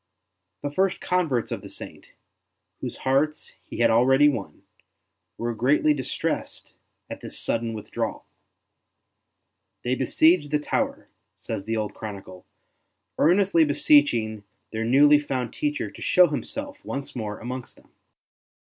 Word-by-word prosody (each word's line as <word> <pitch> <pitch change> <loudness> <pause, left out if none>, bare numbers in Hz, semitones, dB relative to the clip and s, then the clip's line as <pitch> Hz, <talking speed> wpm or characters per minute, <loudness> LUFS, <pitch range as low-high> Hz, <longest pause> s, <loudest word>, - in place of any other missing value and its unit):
The 145 - -2
first 190 +4 +1
converts 165 -10 0
of - - -3
the - - -10
Saint, - - -9 0.7
whose - - -6
hearts 140 +3 0
he - - -6
had - - +5
already 135 +5 +5
won, 140 - -5 0.7
were 120 0 -2
greatly 140 +6 +3
distressed 135 -4 -3 0.3
at - - -8
this - - -6
sudden 115 -1 -1
withdrawal. 105 - -4 1.6
They 125 - 0
besieged 150 +4 +3
the 150 - +2
tower, 150 - -2 0.3
says 95 - -6
the 115 +1 -1
old 105 -1 -2
chronicle, 95 -4 -9 0.7
earnestly 180 0 +4
beseeching 145 - +3 0.3
their 110 0 -2
newly 145 +5 +6
found 130 -5 -3
teacher 145 -8 -2
to - - -13
show 180 - +5
himself 285 - -5
once 140 0 -5
more 105 -3 -4
amongst 125 +1 -6
them. - - -23
135 Hz, 130 wpm, -25 LUFS, 115-150 Hz, 1.6 s, newly